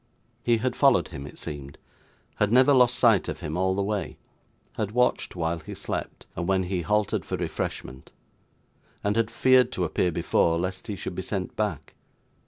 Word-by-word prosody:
He 120 -1 +2
had 125 +3 -1
followed 130 - +4
him, 70 +1 -7
it - - -12
seemed; 70 -1 -7 0.6
had 105 0 +2
never 130 +4 +6
lost 125 -1 +4
sight 115 -8 +4
of - - -5
him 75 - -4
all 95 +1 +1
the 100 - 0
way; 105 0 -3 0.6
had 105 -1 -3
watched 125 -4 +1
while 85 -1 -1
he - - -9
slept, - - -5
and 85 - -3
when 95 -1 +2
he 90 0 -2
halted 105 +3 0
for - - -3
refreshment; 65 +1 -5 0.9
and 105 0 +1
had 115 -1 +1
feared 130 +2 +4
to 90 - 0
appear 90 +2 0
before, 85 +1 +2
lest 90 +2 -4
he 105 - -3
should 95 - -5
be 95 - -4
sent 95 -1 -4
back. 105 -9 -3
100 Hz, 185 wpm, -26 LUFS, 85-115 Hz, 0.9 s, never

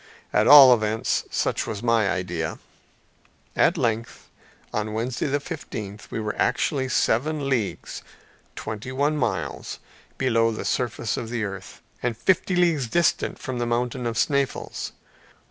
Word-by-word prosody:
At - - +3
all 140 -3 +10
events, 110 -1 0
such - - -1
was 110 0 -5
my 115 -4 +3
idea. 90 -4 -2 1.0
At 175 - +3
length, 115 -4 -2 0.4
on 105 0 -2
Wednesday 120 +5 -2
the 145 +1 0
fifteenth, 110 - -7
we - - -4
were 105 -1 -2
actually 135 -4 +1
seven 140 +5 +1
leagues 120 -7 -2 0.5
(twenty 110 +4 -6
one 145 +3 +1
miles) 145 - -2 0.4
below 115 -3 +2
the 110 - -4
surface 120 -3 -1
of 115 - -4
the 115 -2 -2
earth, 100 -2 -7 0.2
and 120 -3 -1
fifty 185 +3 +1
leagues 165 -7 +2
distant 170 +7 +1
from 130 -2 -5
the 120 - -1
mountain 120 +1 -1
of 115 - -3
Sneffels. 140 -2 -1
120 Hz, 140 wpm, -24 LUFS, 110-140 Hz, 1.0 s, all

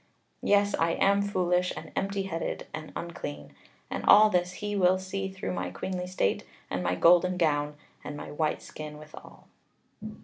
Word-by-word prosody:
Yes, 205 0 +3
I 165 0 +2
am 200 +2 +3
foolish, 180 -2 +1
and - - -8
empty 195 0 -1
headed, 165 -3 -4
and 155 - -6
unclean. 75 - -6 0.4
And - - -3
all 215 +1 +8
this 180 0 +1
he 205 +1 -4
will 185 -1 +4
see 190 +1 -4
through 185 - -4
my 90 -1 -3
queenly 180 - -4
state, 180 - 0 0.3
and 95 - -1
my 90 0 0
golden 180 - +5
gown, 150 -3 +1 0.3
and 145 - -6
my 145 - -7
white 155 +1 -1
skin 150 -1 -8
withal." 155 0 -13
180 Hz, 165 wpm, -28 LUFS, 150-190 Hz, 0.4 s, all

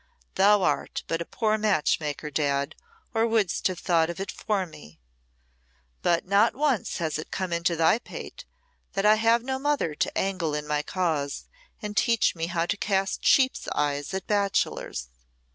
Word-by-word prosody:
"Thou 205 0 +4
art - - -1
but 165 0 -1
a - - -3
poor 215 +2 0
match 205 -8 +2
maker, 150 0 -4
Dad, 140 0 0 0.4
or 225 0 +2
wouldst 220 -6 +1
have 185 -2 -4
thought 165 -2 +2
of 170 - -5
it 195 - -3
for 200 -3 -1
me. 80 - -14 1.0
But 170 -1 +1
not 200 +4 +3
once 275 -5 0
has 160 -3 -2
it 155 - -7
come 185 -2 -3
into 170 0 +1
thy 165 +7 +3
pate - - -9 0.5
that 195 +1 0
I 210 - +7
have 230 +2 +3
no 265 +1 -2
mother 285 - 0
to 150 - -2
angle 185 -6 -1
in 150 0 -3
my 150 0 0
cause 155 -4 -2 0.4
and 210 0 -4
teach 230 0 +3
me 165 0 -2
how 170 -1 0
to 205 - -1
cast 195 -1 -1
sheep's 260 -1 +3
eyes 145 +1 -1
at 190 - -4
bachelors. 200 - -1
185 Hz, 175 wpm, -26 LUFS, 160-210 Hz, 1.0 s, I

